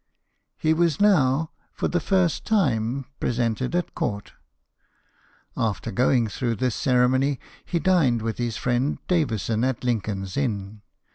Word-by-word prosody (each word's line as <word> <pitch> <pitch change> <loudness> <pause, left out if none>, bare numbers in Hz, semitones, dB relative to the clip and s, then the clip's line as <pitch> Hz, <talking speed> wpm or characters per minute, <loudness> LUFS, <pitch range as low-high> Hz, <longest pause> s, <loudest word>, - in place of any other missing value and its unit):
He 155 - +2
was 165 -2 +1
now, 160 -7 +3 0.2
for - - -1
the 175 - 0
first 180 0 +1
time, 135 - +1
presented 120 +4 -1
at 175 - -1
court. 100 0 -3 1.2
After 110 -3 -2
going 120 +2 +2
through 115 +2 -2
this 125 0 0
cere 125 0 +3
mony, 135 +2 +1 0.2
he 175 - -2
dined 160 - +2
with 115 0 -3
his 120 -2 -2
friend 125 +3 0
Davison 115 - 0
at 130 -1 -1
Lincoln's 100 -5 -2
Inn. 105 -6 -2
125 Hz, 135 wpm, -24 LUFS, 115-155 Hz, 1.2 s, now